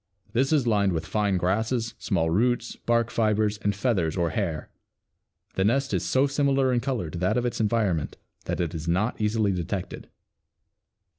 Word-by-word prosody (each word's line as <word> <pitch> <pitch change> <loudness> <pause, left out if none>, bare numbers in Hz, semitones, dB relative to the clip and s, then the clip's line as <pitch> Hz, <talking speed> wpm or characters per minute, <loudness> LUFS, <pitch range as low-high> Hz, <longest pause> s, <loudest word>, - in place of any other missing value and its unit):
This 130 +4 +2
is 145 -5 +3
lined 100 -4 +2
with 80 0 -2
fine 100 0 0
grasses, 110 +6 0
small 80 -6 0
roots, 120 +5 +1
bark 115 0 0
fibers 105 -2 +1
and 100 -2 0
feathers 95 -8 0
or 85 -2 +1
hair. 85 -8 -3 0.8
The 95 - 0
nest 135 +7 +1
is - - 0
so 130 +2 +2
similar 135 -2 +2
in 120 - +2
color 115 - -2
to 85 - -5
that 90 +6 +1
of 125 - 0
its 120 - -1
environment 100 - 0 0.3
that - - -2
it 85 -3 -1
is 80 -1 -5
not 105 +7 0
easily 105 -1 +1
detected. 90 +1 -4
105 Hz, 170 wpm, -26 LUFS, 90-120 Hz, 0.8 s, is